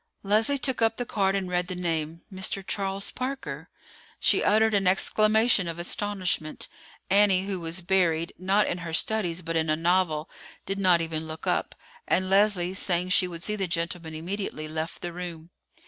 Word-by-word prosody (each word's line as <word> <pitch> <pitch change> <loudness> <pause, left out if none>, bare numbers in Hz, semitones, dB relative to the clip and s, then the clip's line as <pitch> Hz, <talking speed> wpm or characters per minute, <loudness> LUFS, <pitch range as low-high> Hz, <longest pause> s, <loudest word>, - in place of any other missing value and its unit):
Leslie 220 +7 +3
took 260 -3 -1
up 225 0 +3
the 245 - -2
card 195 -3 +1
and 195 -2 -1
read 180 0 -1
the 185 - -4
name: 165 -2 -2
"Mr. 190 +1 -2
Charles 195 0 -2
Parker." 260 +2 -5 0.5
She - - +3
uttered 220 +1 +4
an 195 -2 +2
exclamation 215 +1 +3
of 165 0 -4
astonishment. 180 -3 -1 0.4
Annie, 195 -2 +4
who 195 -2 -2
was 165 +2 -2
buried, 170 -3 +1
not 195 +3 +2
in 175 - -2
her 165 -1 -6
studies 180 -2 -1
but 165 0 -3
in 160 -1 +1
a 155 - +3
novel, 165 -2 +1 0.4
did 195 +1 -3
not 180 -3 +4
even 160 -1 -3
look 160 0 -7
up; - - -1 0.3
and 185 0 +1
Leslie, 195 -3 +3
saying 180 -1 0
she 185 0 +4
would 170 -1 -8
see 210 - 0
the 195 -3 -2
gentleman 170 -1 -3
immediately, 170 -2 -4
left 160 +1 -5
the 175 -1 -4
room. 170 -2 -7
185 Hz, 180 wpm, -27 LUFS, 165-200 Hz, 0.5 s, uttered